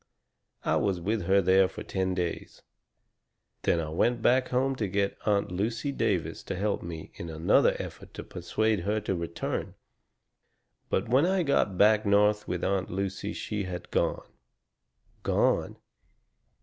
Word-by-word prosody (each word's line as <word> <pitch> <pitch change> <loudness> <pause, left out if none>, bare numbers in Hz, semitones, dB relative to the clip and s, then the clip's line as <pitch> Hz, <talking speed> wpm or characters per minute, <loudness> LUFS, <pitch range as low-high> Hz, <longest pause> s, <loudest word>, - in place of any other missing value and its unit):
I - - +2
was 95 -3 0
with 105 +2 -1
her 95 +2 +4
there 95 +1 +5
for - - -8
ten 95 -1 -1
days; 90 -2 -4 1.0
then 85 - +2
I 80 -2 -3
went 115 +9 +1
back 130 +1 +4
home 135 +2 +1
to 105 - -1
get 100 +1 0
Aunt 100 -3 +2
Lucy 115 +9 -1
Davis - - -1
to - - -3
help 100 +2 -1
me 80 -2 -7
in 85 - -7
another 80 +1 +3
effort - - -8
to - - -6
persuade 100 +5 -1
her 105 +5 0
to 105 -2 -2
return. 85 -2 -4 1.1
But 95 - 0
when 135 +8 +4
I 190 -1 +2
got 120 - +1
back 105 +2 +5
North 105 +1 +3
with 90 -1 -3
Aunt 95 -1 0
Lucy 95 +1 -3
she 105 -2 -3
had 90 -2 -7
gone." - - 0 1.0
"Gone?" - - +1
100 Hz, 150 wpm, -28 LUFS, 90-110 Hz, 1.1 s, there